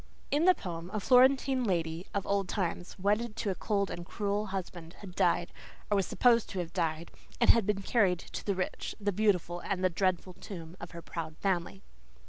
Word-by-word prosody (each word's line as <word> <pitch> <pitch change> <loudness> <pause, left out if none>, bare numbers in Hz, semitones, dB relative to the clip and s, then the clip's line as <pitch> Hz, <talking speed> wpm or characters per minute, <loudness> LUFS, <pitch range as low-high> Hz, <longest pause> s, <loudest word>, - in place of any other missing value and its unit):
In 295 +4 +3
the 370 0 +7
poem 170 -2 -6
a - - +1
Florentine 260 +2 +4
lady 170 -4 -1
of 200 -1 -2
old 200 -2 0
time, 180 -3 -1
wedded 210 +4 0
to 205 - -1
a - - 0
cold 200 0 -1
and 175 - -5
cruel 205 +3 -2
husband, 180 -3 -6
had 190 -3 -9
died, 175 -1 +1 0.4
or - - +4
was 195 -2 +1
supposed 235 +2 +3
to 195 - -6
have 175 -2 -3
died, 160 0 -1 0.3
and - - +7
had 230 -4 +1
been 200 -1 0
carried 195 -5 +3
to - - -8
"the 200 - 0
rich, 185 - -3
the 205 0 0
beautiful, 180 -4 +1 0.2
the 185 0 +2
dreadful 185 0 0
tomb" 175 -2 -9
of 175 - -7
her 170 -1 -9
proud 160 -2 -6
family. 175 - -1
190 Hz, 195 wpm, -31 LUFS, 175-210 Hz, 0.4 s, the